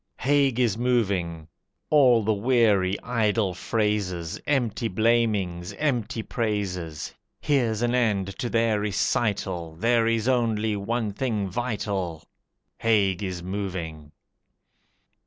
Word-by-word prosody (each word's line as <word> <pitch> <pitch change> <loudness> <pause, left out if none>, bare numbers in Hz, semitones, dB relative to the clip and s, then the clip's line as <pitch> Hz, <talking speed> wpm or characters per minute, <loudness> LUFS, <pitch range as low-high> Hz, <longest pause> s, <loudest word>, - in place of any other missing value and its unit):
Haig 140 -3 +2
is 115 -3 +1
moving! 95 -10 0 0.4
All 130 -7 +5
the 110 +1 +2
weary 105 -4 +2
idle 110 -5 +1
phrases, 95 -4 -2
Empty 120 -5 0
blamings, 105 -4 +1
empty 115 -4 -1
praises, 95 -10 -3 0.3
Here's 120 -6 +1
an 120 0 +1
end 100 -6 +1
to 120 - -2
their 115 -2 +2
recital, 95 -5 -1
There 115 +5 +2
is 115 0 +1
only 110 -4 +1
one 110 +2 -2
thing 110 -4 -1
vital 95 -7 -3 0.6
Haig 100 -5 +2
is 90 -3 -4
moving! 90 -6 -5
105 Hz, 105 wpm, -25 LUFS, 95-120 Hz, 0.6 s, All